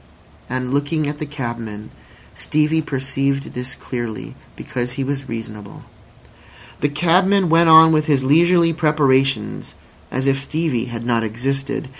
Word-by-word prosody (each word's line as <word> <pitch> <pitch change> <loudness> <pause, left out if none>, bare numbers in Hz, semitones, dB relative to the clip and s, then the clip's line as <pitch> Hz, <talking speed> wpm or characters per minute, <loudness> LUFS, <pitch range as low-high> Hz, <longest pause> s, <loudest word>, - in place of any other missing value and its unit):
And 130 +1 -3
looking 145 +2 0
at 145 0 -5
the 155 - -4
cabman, 115 -6 -6 0.4
Stevie 155 +1 0
perceived 135 -1 -2
this 125 +2 -5
clearly, 120 -6 -6 0.2
because 125 0 -4
he 135 0 -3
was 135 -1 -4
reasonable. 110 -3 -8 1.0
The 145 - +1
cabman 180 +5 +2
went 165 +1 +4
on 160 0 +8
with 155 -1 +1
his 140 -3 +2
leisurely 165 +4 +4
preparations 135 -7 +1 0.3
as 130 +1 -2
if 135 0 +1
Stevie 150 -5 -2
had 115 -2 -7
not 115 -2 +1
existed. 135 +5 -3
135 Hz, 135 wpm, -19 LUFS, 125-155 Hz, 1.0 s, on